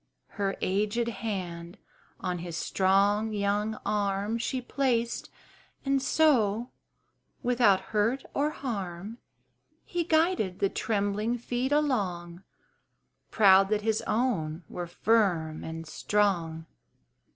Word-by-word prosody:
Her 200 Hz, -1 st, -2 dB
aged 210 Hz, +5 st, 0 dB
hand 185 Hz, -5 st, -5 dB, 0.4 s
on 180 Hz, -1 st, -2 dB
his 170 Hz, -1 st, -5 dB
strong 200 Hz, +4 st, +2 dB
young 205 Hz, +1 st, 0 dB
arm 205 Hz, +2 st, 0 dB
She 255 Hz, +3 st, -1 dB
placed, 245 Hz, -2 st, -1 dB, 0.6 s
and 275 Hz, 0 st, +2 dB
so, 245 Hz, -7 st, +2 dB, 0.7 s
without 235 Hz, -6 st, +4 dB
hurt 225 Hz, +6 st, +1 dB
or 290 Hz, +2 st, +1 dB
harm, 205 Hz, -, -5 dB, 0.7 s
He 350 Hz, -1 st, -1 dB
guided 320 Hz, -, +1 dB
the 195 Hz, -, +1 dB
trembling 210 Hz, +3 st, -1 dB
feet 245 Hz, +3 st, -2 dB
along, 190 Hz, -, 0 dB, 0.9 s
Proud 195 Hz, -2 st, +6 dB
that 210 Hz, -1 st, 0 dB
his 220 Hz, 0 st, +1 dB
own 185 Hz, -9 st, 0 dB
were 175 Hz, -1 st, -5 dB
firm 175 Hz, -6 st, +1 dB
and 165 Hz, 0 st, -6 dB
strong. 170 Hz, -5 st, 0 dB
210 Hz, 105 wpm, -28 LUFS, 185-235 Hz, 0.9 s, Proud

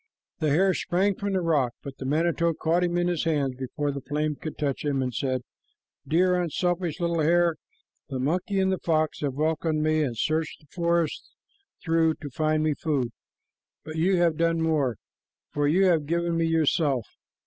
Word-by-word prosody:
The 155 Hz, -2 st, +1 dB
hare 185 Hz, +6 st, +3 dB
sprang 190 Hz, +4 st, +1 dB
from 200 Hz, +1 st, -3 dB
the 190 Hz, -, +1 dB
rock, 145 Hz, -8 st, +1 dB
but 140 Hz, -1 st, -8 dB
the 130 Hz, -, -4 dB
manito 165 Hz, +2 st, +1 dB
caught 170 Hz, +4 st, +1 dB
him 175 Hz, 0 st, 0 dB
in 175 Hz, 0 st, +1 dB
his 175 Hz, -3 st, -1 dB
hands 145 Hz, -5 st, +1 dB
before 145 Hz, +3 st, -3 dB
the 140 Hz, 0 st, -5 dB
flame 150 Hz, +3 st, -1 dB
could 155 Hz, +2 st, -7 dB
touch 140 Hz, -3 st, -2 dB
him, 145 Hz, -2 st, 0 dB
and 130 Hz, -1 st, -1 dB
said, 130 Hz, +2 st, -1 dB, 0.6 s
"Dear, 180 Hz, +2 st, +3 dB
unselfish 175 Hz, +1 st, -1 dB
little 170 Hz, -1 st, 0 dB
hare, 170 Hz, +1 st, +3 dB, 0.5 s
the 135 Hz, -, -3 dB
monkey 180 Hz, +9 st, 0 dB
and 190 Hz, 0 st, +2 dB
the 190 Hz, -, -1 dB
fox 155 Hz, -2 st, 0 dB
have 140 Hz, -3 st, -2 dB
welcomed 155 Hz, +1 st, 0 dB
me 155 Hz, 0 st, +2 dB
and 125 Hz, -6 st, -2 dB
searched 155 Hz, +5 st, -1 dB
the 150 Hz, -, -24 dB
forest 170 Hz, -2 st, 0 dB, 0.5 s
through 165 Hz, -1 st, +2 dB
to 145 Hz, -2 st, -9 dB
find 155 Hz, +2 st, +1 dB
me 155 Hz, -1 st, +2 dB
food, 140 Hz, -5 st, -1 dB, 0.7 s
but 155 Hz, -, -8 dB
you 185 Hz, +4 st, +3 dB
have 170 Hz, -3 st, +2 dB
done 165 Hz, 0 st, +2 dB
more, 155 Hz, -7 st, +1 dB, 0.6 s
for 145 Hz, 0 st, 0 dB
you 185 Hz, +6 st, +4 dB
have 165 Hz, -5 st, +2 dB
given 170 Hz, +1 st, 0 dB
me 165 Hz, 0 st, +1 dB
yourself. 155 Hz, -5 st, +2 dB
160 Hz, 185 wpm, -26 LUFS, 145-170 Hz, 0.7 s, you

